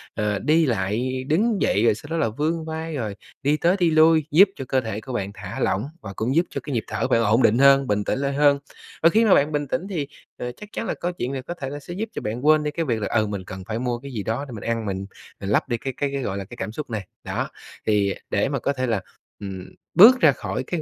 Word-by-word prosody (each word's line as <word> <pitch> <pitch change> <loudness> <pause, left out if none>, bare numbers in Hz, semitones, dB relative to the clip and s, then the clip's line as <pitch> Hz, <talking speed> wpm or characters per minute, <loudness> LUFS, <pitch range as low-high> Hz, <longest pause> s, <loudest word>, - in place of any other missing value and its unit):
à, 105 -2 0
đi 160 +2 +4
lại, 120 +3 -1
đứng 205 +8 +2
dậy 105 - +2
rồi 105 - +4
sau 110 - -11
đó 165 - 0
là 155 - +1
vươn 160 +8 -2
vai 160 0 -4
rồi 110 -7 -3 0.3
đi 145 +2 +2
tới 170 +4 +3
đi 170 -3 +3
lui, 160 -1 +5
giúp 190 +6 +7
cho 135 - -6
cơ 130 +1 +1
thể 110 -2 -4
của 130 - -7
bạn 100 -4 -2
thả 100 -1 -7
lỏng, 105 +6 0 0.2
và 100 - -7
cũng 125 +6 -1
giúp 170 - +4
cho - - -5
cái 145 - -5
nhịp 115 - 0
thở - - -1
của - - 0
bạn 115 - +4
ổn 110 +4 +3
định 110 - +4
hơn, 135 0 +6
bình 105 0 +1
tĩnh 130 - -1
lại 140 0 -1
hơn. 145 0 +4 0.4
Và 165 - +8
khi 220 +6 +3
mà 205 - +6
bạn 145 +2 +2
bình 145 -1 -1
tĩnh 175 +9 -2
thì, 155 -8 -2 0.3
ờ, 125 - -4
chắc 205 +12 -12
chắn - - -3
là - - 0
câu 175 +1 -3
chuyện 130 -7 -4
này 135 - -3
có 170 - -6
thể 140 -6 -6
sẽ 175 - -8
giúp 210 +5 -4
cho - - -4
bạn 115 +6 -4
quên 155 0 +5
đi 150 - -1
cái 165 +1 -2
việc 115 -4 -1
là, - - -1
ừ, 110 -2 +1
mình 100 -2 -4
cần 95 0 -8
phải 110 +1 -2
mua 120 -1 -2
cái 140 +1 -9
gì 105 -4 -3
đó 115 +6 -2
để - - -10
mình 105 - -7
ăn, 115 -1 -1
mình 95 -1 -3 0.4
mình 100 - -4
lấp 110 - +1
đi 120 - 0
cái 135 +3 -4
cái 140 -1 -1
cái, 140 - -1
gọi 100 -5 -3
là, 100 - -4
cái 120 +5 -12
cảm 105 - -4
xúc 145 +5 -6
này. 110 -5 -4 0.2
Đó, - - -3 0.4
thì 100 -2 +2 0.2
để 100 +6 +1
mà 140 - -1
có 140 - 0
thể 130 -1 -2
là, 110 -4 0 0.4
ừm, 95 -2 -7 0.3
bước 240 +7 +9
ra 155 -4 +7
khỏi 130 - -4
cái 165 +4 -3
130 Hz, 290 wpm, -23 LUFS, 110-155 Hz, 0.4 s, bước